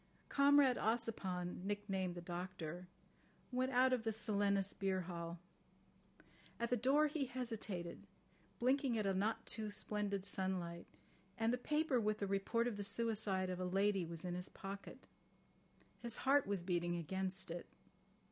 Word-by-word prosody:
Comrade 280 -2 +6
Ossipon, 195 -6 -1
nicknamed 195 -3 -1
the 175 - -6
Doctor, 175 -1 -5 0.6
went 255 +1 +1
out 255 +1 +5
of 245 -3 +1
the 225 - +1
Silenus 200 -3 +1
beer 190 -1 0
hall. 170 -1 -5 1.2
At 235 +1 -1
the - - +5
door 270 +6 +4
he 295 -2 0
hesitated, 225 -8 -4 0.5
blinking 260 -1 +2
at 215 - 0
a 195 - +2
not 220 +4 0
too 215 -1 -2
splendid 205 -1 -1
sunlight—and 190 +3 -3
the - - +2
paper 300 -1 +2
with 215 0 +1
the 205 - -1
report 200 +4 +1
of 225 -4 -2
the 205 - -2
suicide 200 -3 +1
of 180 - -3
a 185 - -1
lady 195 +1 +2
was 165 0 -6
in 175 - -2
his 180 +1 -4
pocket. 195 +1 -8 1.0
His 235 -1 -1
heart 280 -1 +5
was 200 -3 -1
beating 175 -1 0
against 190 +2 -2
it. 170 +1 -5
200 Hz, 145 wpm, -39 LUFS, 185-235 Hz, 1.2 s, Comrade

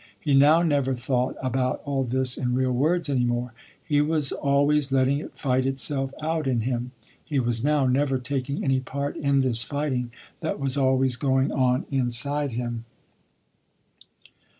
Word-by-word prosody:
He 140 +7 -1
now 150 +5 +6
never 140 -5 +1
thought 125 +1 -1
about 130 0 -1
all 140 -2 0
this 130 +1 +1
in 125 -1 -1
real 130 0 +1
words 155 +7 +1
any 135 -3 +1
more. 120 0 -1 0.3
He 145 -2 +2
was 150 -2 0
always 145 0 +2
letting 135 +1 +2
it - - -10
fight 130 -2 +1
itself 135 0 0
out 160 -2 -1
in 125 -3 +1
him. 120 +1 -2 0.3
He 145 -4 -1
was 120 -2 -1
now 145 -1 +2
never 135 +1 +1
taking 135 +2 -3
any 135 -1 +2
part 140 +3 -4
in 140 -1 +1
this 120 -3 +2
fighting 130 -1 -2 0.3
that - - -3
was 135 -1 -1
always 130 -2 +2
going 135 +1 +1
on 130 -1 +1
inside 135 +2 -1
him. 120 -1 -4
135 Hz, 160 wpm, -25 LUFS, 125-145 Hz, 0.3 s, now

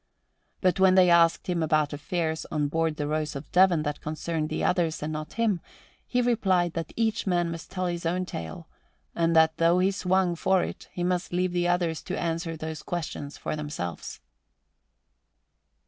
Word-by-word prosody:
But 185 0 +2
when 190 -1 +6
they 180 -2 +6
asked 170 -1 +4
him 175 -3 -1
about 155 -2 +1
affairs 160 +2 -2
on 150 -2 0
board 165 0 0
the 150 - -3
Rose 155 0 -2
of 140 +1 -8
Devon 180 -4 +4
that 150 -1 -3
concerned 155 +1 -3
the - - -2
others 165 -4 +1
and 155 +1 -3
not 155 0 -5
him, 220 -7 +1 0.5
he 245 0 +1
replied 190 -8 +2
that 165 -2 -4
each 225 -2 0
man 175 -2 +1
must 165 -1 -7
tell 185 -1 -3
his 175 -1 -2
own 180 +2 0
tale 80 - -7 0.5
and 165 0 +1
that 160 0 +5
though 165 +1 +4
he 185 +2 +3
swung 185 -2 +1
for 185 +2 +2
it - - -6
he 175 - -4
must 180 0 -1
leave 180 +1 0
the 175 0 0
others 175 -2 0
to 185 - -4
answer 165 -1 -2
those 155 -1 -5
questions 150 -3 -5
for - - -3
themselves. 145 - -5
170 Hz, 180 wpm, -27 LUFS, 155-180 Hz, 0.5 s, when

